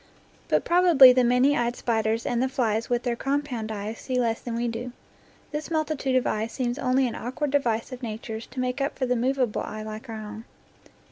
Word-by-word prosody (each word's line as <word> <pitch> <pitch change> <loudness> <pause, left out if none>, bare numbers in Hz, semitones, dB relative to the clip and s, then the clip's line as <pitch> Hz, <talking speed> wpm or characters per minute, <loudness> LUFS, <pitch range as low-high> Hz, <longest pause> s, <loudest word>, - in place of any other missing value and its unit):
But - - +1
probably 340 -8 +7
the 255 0 +3
many 250 +4 +4
eyed 240 -1 0
spiders 225 -1 0
and 240 0 0
the 260 - +1
flies 230 -4 0
with 240 0 0
their 240 -1 0
compound 270 -4 -2
eyes 215 +1 -5
see 255 -1 -2
less 230 -2 0
than 235 -2 -4
we 240 +1 -1
do. 240 +2 -5 0.6
This 300 0 -4
multitude 310 -5 -1
of 255 - +2
eyes 220 +1 -1
seems 245 -1 -2
only 255 +1 +2
an 235 - -4
awkward 260 +4 -3
device 235 -6 0
of 255 0 -7
Nature's 220 -1 -6
to 255 - -8
make 255 +2 -1
up 275 +2 -2
for 260 - 0
the 250 0 +1
movable 250 -1 0
eye 215 0 -6
like 215 +3 -8
our 225 - -5
own. 215 +1 -8
245 Hz, 210 wpm, -26 LUFS, 225-265 Hz, 0.6 s, probably